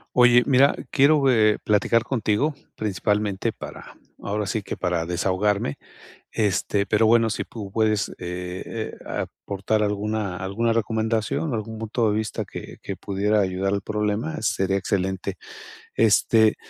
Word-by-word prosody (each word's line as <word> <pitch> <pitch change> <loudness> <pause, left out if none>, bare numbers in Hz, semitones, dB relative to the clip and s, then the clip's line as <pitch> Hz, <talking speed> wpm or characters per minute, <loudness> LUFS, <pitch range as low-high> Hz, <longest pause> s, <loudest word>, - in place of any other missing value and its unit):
Oye, 120 -1 +6
mira, 140 +1 +5 0.2
quiero, 140 0 +4
eh, 110 -3 +4
platicar 110 +2 +2
contigo, 120 +4 0 0.2
principalmente 105 +1 -1
para, - - -10 0.3
ahora 105 +1 -2
sí 110 +2 -2
que - - -5
para 90 -2 -1
desahogarme, 95 0 0 0.6
este, 100 -1 +1
pero, 110 +1 +3
bueno, 115 0 +4
si 105 - -3
pu 105 -4 -8
puedes, 110 -1 +1
eh 90 0 -5
eh, 110 -1 -5
aportar 100 +2 -2
alguna 105 -1 -1
alguna 100 +5 0
recomendación, 110 +5 0
algún 110 0 -4
punto 110 0 0
de - - 0
vista 110 -1 -2
que - - -9
que 100 - -5
pudiera 105 +2 0
ayudar 95 0 0
al 100 - -1
problema, 105 +8 -2
sería 95 0 +1
excelente. 95 0 -2 0.6
Este, 110 0 +4
105 Hz, 135 wpm, -24 LUFS, 100-115 Hz, 0.6 s, Oye